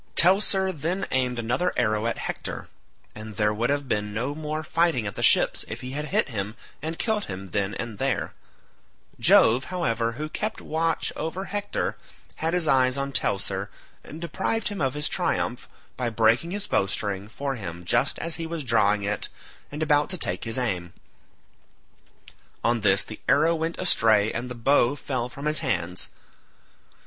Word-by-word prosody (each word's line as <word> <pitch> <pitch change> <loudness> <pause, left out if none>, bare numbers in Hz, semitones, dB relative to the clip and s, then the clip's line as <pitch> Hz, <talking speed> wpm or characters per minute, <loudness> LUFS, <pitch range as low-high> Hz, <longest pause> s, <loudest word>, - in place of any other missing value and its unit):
Teucer 190 +1 +5
then 175 +4 -2
aimed 125 -1 +1
another 120 +10 0
arrow 110 0 +1
at 115 - -1
Hector, - - -5 0.4
and 110 0 -8
there 105 +1 +2
would 115 +4 0
have 140 -1 0
been 105 -3 -1
no 125 +6 -1
more 155 +1 -4
fighting 160 -6 +1
at 100 - -3
the - - -5
ships - - +4
if - - -6
he 125 - -6
had 150 +2 -3
hit 200 +1 +1
him 105 -2 -3 0.3
and 160 +2 -4
killed 220 -2 0
him 95 -1 -7
then 100 0 -1
and 115 -3 -5
there: 135 -1 -1 0.9
Jove, 120 +4 +5
however, 115 -11 -1
who 150 +6 -4
kept 215 +7 -3
watch 160 +1 0
over 180 +4 -3
Hector, 205 0 -2 0.4
had 165 +2 0
his 175 -3 +2
eyes 130 -1 +4
on 140 0 -2
Teucer, 100 -4 +1 0.3
and 155 - -9
deprived 185 +7 -1
him 205 -3 -5
of 135 0 0
his 150 0 0
triumph, - - -1 0.3
by 125 -2 0
breaking 115 +7 +3
his 205 +2 -1
bowstring 100 - -1
for 135 +5 -3
him 90 -7 -7
just - - +2
as 165 -1 0
he 165 -1 -4
was 165 -2 -4
drawing 105 -4 +3
it 100 0 -2 0.4
and 150 +2 -2
about 145 -1 +3
to 185 - -2
take - - -2
his 115 +1 -1
aim; 90 -9 -2 1.7
on 115 -1 +2
this 95 -1 +4
the 110 - -10
arrow 165 +1 +5
went 165 +1 -2
astray 110 -1 +3
and 120 +2 -3
the 125 - -6
bow 125 +2 +3
fell 125 -3 -3
from 140 +4 -8
his 150 0 +4
hands. 95 - -1
130 Hz, 175 wpm, -26 LUFS, 110-160 Hz, 1.7 s, Teucer